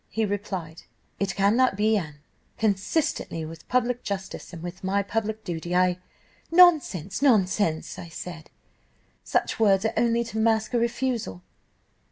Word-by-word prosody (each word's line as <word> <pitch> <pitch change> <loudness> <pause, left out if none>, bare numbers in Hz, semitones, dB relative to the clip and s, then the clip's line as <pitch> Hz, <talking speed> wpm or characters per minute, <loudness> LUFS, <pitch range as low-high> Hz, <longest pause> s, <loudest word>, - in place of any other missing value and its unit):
He 220 0 0
replied, 190 -5 -4 0.4
'It 200 -1 -1
cannot 210 +4 +3
be, 215 +1 +3
Anne, 150 -7 -4 0.4
consistently 200 - -1
with 160 0 -10
public 245 -1 +1
justice, 195 -2 -5
and 170 -2 -9
with 180 +2 -7
my 200 +2 +1
public 220 +1 -3
duty. 175 +1 -4
I 180 0 +3 0.2
' - - -33
"'Nonsense, 300 - +4
nonsense,' 195 - +2
I 170 - -8
said, 165 -1 -8 0.7
'such - - -1
words 200 -2 +4
are 220 - 0
only 235 0 +2
to 225 -1 -5
mask 220 +1 +1
a 240 - +3
refusal. 235 - -2
200 Hz, 145 wpm, -26 LUFS, 180-230 Hz, 0.7 s, Nonsense